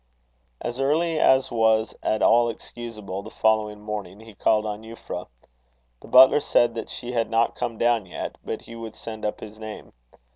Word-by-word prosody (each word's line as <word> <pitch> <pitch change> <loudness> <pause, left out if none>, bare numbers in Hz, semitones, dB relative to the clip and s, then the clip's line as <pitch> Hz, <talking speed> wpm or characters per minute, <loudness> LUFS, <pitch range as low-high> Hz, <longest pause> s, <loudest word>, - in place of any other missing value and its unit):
As 120 +2 -4
early 155 +4 +1
as 130 -2 +4
was 110 -1 +2
at 110 - 0
all 120 0 +5
excusable, 110 -4 -7
the - - -10
following 110 -1 +1
morning, 105 -2 -6
he 110 -1 -13
called 105 +2 +2
on 105 0 -4
Euphra. 115 +1 -7 0.7
The - - -13
butler 130 +3 +8
said 120 -4 +2
that 115 - -5
she 120 - -6
had 115 -2 0
not 115 0 +2
come 120 -2 -3
down 115 -4 +2
yet, 90 - -6
but - - -5
he 115 - -11
would 115 -1 -8
send 110 -1 -8
up 105 - -3
his 110 0 -10
name. 110 -1 -9
115 Hz, 180 wpm, -24 LUFS, 105-120 Hz, 0.7 s, butler